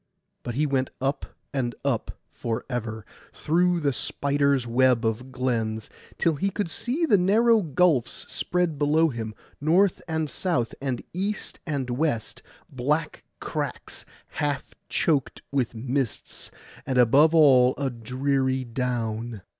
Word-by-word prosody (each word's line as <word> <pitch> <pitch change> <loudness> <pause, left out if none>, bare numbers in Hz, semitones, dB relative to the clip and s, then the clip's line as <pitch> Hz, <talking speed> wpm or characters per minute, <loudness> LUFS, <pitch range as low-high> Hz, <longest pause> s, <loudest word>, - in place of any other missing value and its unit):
But 120 - -5
he 150 +3 +2
went 135 -2 0
up 135 +2 -1 0.3
and 120 -4 -1
up 130 -5 -1
for 115 -1 -3
ever, 110 -3 -4 0.3
through 175 +2 +2
the 140 -2 +1
spider's 140 -1 +1
web 125 0 +3
of 115 +4 -2
glens, 115 -4 -2 0.3
till 165 -3 +1
he 195 +7 +1
could 195 -3 -3
see 275 - 0
the 210 - +4
narrow 220 +5 +4
gulfs 155 -5 +1
spread 175 -5 -1
below 155 +2 +3
him, 110 -4 -5 0.3
north 175 +6 +3
and 160 -1 -1
south, 140 -7 -1
and 130 -3 -2
east 200 +4 -3
and 135 -5 -2
west; 125 -3 -1 0.3
black 150 +4 -1 0.2
cracks - - -5 0.3
half 145 -2 -3 0.2
choked 145 -6 0
with 130 -4 0
mists, 125 +1 -3 0.3
and 130 - -2
above 140 +7 +5
all 130 -5 +6
a 140 -2 -1
dreary 130 +2 0
down. 115 -3 -3
135 Hz, 130 wpm, -25 LUFS, 120-160 Hz, 0.3 s, all